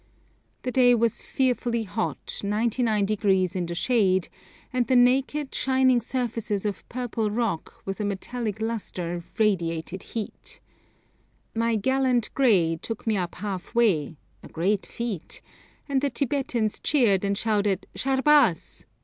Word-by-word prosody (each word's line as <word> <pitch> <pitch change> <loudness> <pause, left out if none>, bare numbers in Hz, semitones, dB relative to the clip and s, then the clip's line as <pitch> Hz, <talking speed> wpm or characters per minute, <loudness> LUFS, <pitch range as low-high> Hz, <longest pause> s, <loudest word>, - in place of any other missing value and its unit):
The 255 - -2
day 245 0 +5
was 230 -1 +1
fearfully 245 -3 0
hot, 210 +2 -2
99° 210 -3 +1
in 180 -2 -1
the 170 - -4
shade, 190 -4 +2 0.4
and 250 -1 +1
the 260 - +3
naked, 265 +3 +3
shining 260 -2 +3
surfaces 230 -4 -2
of 205 -2 -4
purple 235 -3 -2
rock 215 -6 -3
with 195 +1 -4
a - - -1
metallic 210 +2 -3
lustre 180 -6 -3
radiated 180 -4 0
heat. 220 -3 -7 0.9
My 230 0 +1
'gallant 255 +1 +1
grey' 180 -11 +3
took 225 -2 -5
me 220 -2 +1
up 180 -3 -2
half 195 +2 -5
way 170 -10 +2 0.2
a - - -11
great 190 +5 -1
feat 230 -8 -4 0.5
and 275 -2 +1
the 285 - +1
Tibetans 255 -5 -1
cheered 225 -10 +3
and 200 0 0
shouted 205 -4 0
'_Sharbaz! 270 - +2
220 Hz, 130 wpm, -26 LUFS, 195-250 Hz, 0.9 s, day